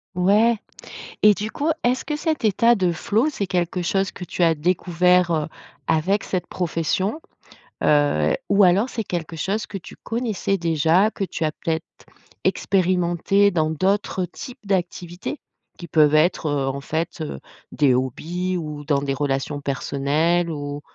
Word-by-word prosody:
Ouais. 210 +6 +4 0.6
Et 210 -1 +7
du 210 +4 -4
coup, 295 +3 -1
est-ce 250 +2 +1
que 300 - -2
cet 310 -2 -2
état 230 +3 +4
de 185 -5 +1
flow, 210 - +1
c'est 210 -9 -3
quelque 180 -1 -1
chose 195 +2 0
que 180 - -9
tu 180 - -5
as 165 -1 +4
découvert, 180 +2 +2
heu, 155 -2 0 0.4
avec 180 +6 +1
cette 180 -2 -3
profession, 185 - -1 0.6
heu, 145 - +3
ou 200 0 +4
alors 195 +6 +4
c'est 230 -3 -4
quelque 170 -4 -4
chose 200 +6 -2
que 195 - -6
tu 185 - -12
connaissais 225 -4 -2
déjà, 165 +4 +2
que 195 - -3
tu 170 - -4
as 155 - +1
peut-être 160 +1 -3 0.6
expérimenté 185 +1 +2
dans 155 -3 +1
d'autres 185 +3 0
types 245 +5 -10
d'activités 180 - -3 0.4
qui 175 - -9
peuvent 155 -1 +4
être, 160 +2 +2
heu, 140 -2 0
en 135 +1 -2
fait, 160 +5 -3
heu, 155 - -5 0.3
des 140 -4 +3
hobbies 165 +9 -2
ou 150 -4 -5
dans 140 -2 +1
des 140 -1 -1
relations 140 +1 -2
personnelles 145 +5 0
ou 145 -1 -5
175 Hz, 160 wpm, -22 LUFS, 155-200 Hz, 0.6 s, Et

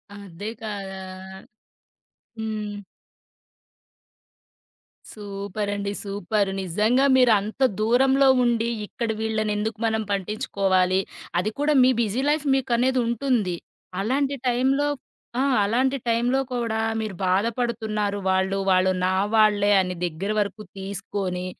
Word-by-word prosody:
అదే 200 0 -7
కదా! 200 -3 -5 1.4
హ్మ్. 215 -2 -4 2.3
సూపరండి. 200 0 -4
సూపర్. 200 0 -1
నిజంగా 215 +9 +2
మీరు 250 -2 +5
అంత 215 +6 -7 0.2
దూరంలో 265 +5 +4 0.2
ఉండి, 235 -1 +1 0.2
ఇక్కడ 230 +2 -4
వీళ్ళన 220 -1 -1
ఎందుకు 220 +2 -2
మనం 220 0 0
పట్టించుకోవాలి. 190 -2 +1 0.4
అది 210 +4 -1
కూడా 295 +1 +2
మీ 255 - +6
బిజీ 225 +3 0
లైఫ్ 300 0 +1
మీకనేది 255 0 +1
ఉంటుంది. 235 -6 0 0.5
అలాంటి 275 +6 0
టైం‌లో 265 +4 +2 0.5
ఆ! - - +3 0.2
అలాంటి 255 +6 +1
టైంలో 240 +3 +2
కూడా 235 -3 -1 0.2
మీరు 215 -3 -4
బాధపడుతున్నారు 215 0 0
వాళ్ళు 190 +1 +1
వాళ్ళు 185 0 +4
నా 185 0 +1 0.2
వాళ్ళే 210 -2 +4
అన్ని 180 -1 -1
దగ్గర 175 +5 -3
వరకు 205 +1 -2
తీసుకొని, 195 -2 -4
215 Hz, 105 wpm, -24 LUFS, 195-240 Hz, 2.3 s, మీ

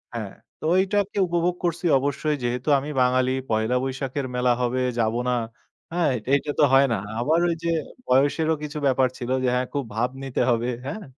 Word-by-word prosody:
হ্যাঁ, 110 -4 -4 0.3
তো - - -15
ওইটাকে 195 +2 +1
উপভোগ 175 +1 0
করছি 170 0 -1
অবশ্যই। 145 +2 -1
যেহেতু 125 +3 -2
আমি 140 +2 -6
বাঙালি, 130 0 +3 0.2
পহেলা 110 +2 +1
বৈশাখের 135 +1 -3
মেলা 125 0 +2
হবে, 125 +1 0 0.2
যাব 110 -1 +1
না? 125 - +2 0.6
হ্যাঁ, 175 -1 +1
এইট 120 -4 -4
এইটা 140 +1 +1
তো - - +6
হয় 135 +1 +6
না। - - 0 0.2
আবার 155 +7 +2
ওই 170 - 0
যে 170 - 0 0.4
বয়সেরও 145 +5 +3
কিছু 150 0 -5
ব্যাপার 130 -1 +3
ছিল 120 - -5
যে, - - +2
হ্যাঁ, 125 0 0
খুব 140 -1 -1
ভাব 120 +3 +1
নিতে 135 -2 -2
হবে। 120 0 +1 0.2
হ্যাঁ? 210 +9 -5
135 Hz, 190 wpm, -24 LUFS, 125-160 Hz, 0.6 s, তো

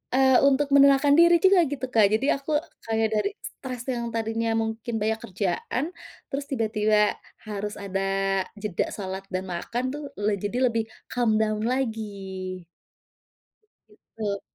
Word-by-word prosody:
eee, 265 -1 +5
untuk 280 +1 +3
menenangkan 280 +1 +6
diri 340 0 +7
juga 380 -1 +6
gitu, 265 -2 -3
Kak. 215 -3 +6
Jadi 270 +6 +1
aku 280 +3 -6 0.4
kayak 225 0 +2
dari 215 - +1
stres 250 -2 -7
yang 235 -1 -2
tadinya 225 0 -1
mungkin 225 +1 -2
banyak 220 +1 0
kerjaan, 195 - -2 0.5
terus 275 +1 -3
tiba-tiba 215 -3 +2 0.3
harus 210 0 -4
ada 195 -1 -3 0.6
jeda 205 -5 -1
salat 190 -1 -5
dan 185 +1 -2
makan 235 +8 -3
tuh 295 0 -6 0.2
le 205 0 +1
jadi 205 +5 -3
lebih 225 -1 0 0.3
calm 235 -3 +2
down 215 0 0
lagi. 200 -7 -3 1.3
Gitu. 210 -1 -5
220 Hz, 135 wpm, -25 LUFS, 205-260 Hz, 1.3 s, diri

